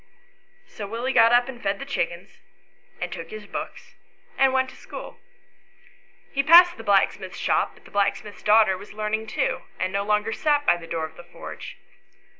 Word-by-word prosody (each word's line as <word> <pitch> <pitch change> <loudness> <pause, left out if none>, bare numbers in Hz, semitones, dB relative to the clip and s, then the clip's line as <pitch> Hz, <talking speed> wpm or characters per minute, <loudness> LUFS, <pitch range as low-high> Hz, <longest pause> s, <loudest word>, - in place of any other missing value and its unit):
So 205 - -8
Willie 235 +5 -3
got 230 0 +6
up 245 +1 +4
and 250 -2 -8
fed 195 0 -1
the 275 - -7
chickens, 180 -8 -4 0.6
and - - -4
took - - -8
his 435 - -8
books - - -7 0.4
and 270 -1 +4
went 260 0 +1
to - - -16
school.. - - -10 1.1
He 275 - +1
passed 345 +4 +7
the 225 - -9
blacksmith's 200 -2 +1
shop, - - 0
but - - -22
the - - -16
blacksmith's 205 0 -1
daughter 215 -2 +5
was 205 - -12
learning 215 +1 -2
too, 260 +3 -1 0.2
and 185 0 -1
no 200 - +1
longer 210 +1 0
sat 295 -2 +1
by 175 - +4
the 165 -1 -11
door 165 -1 -2
of 160 0 -12
the 175 - -11
forge. - - -10
220 Hz, 185 wpm, -24 LUFS, 200-260 Hz, 1.1 s, passed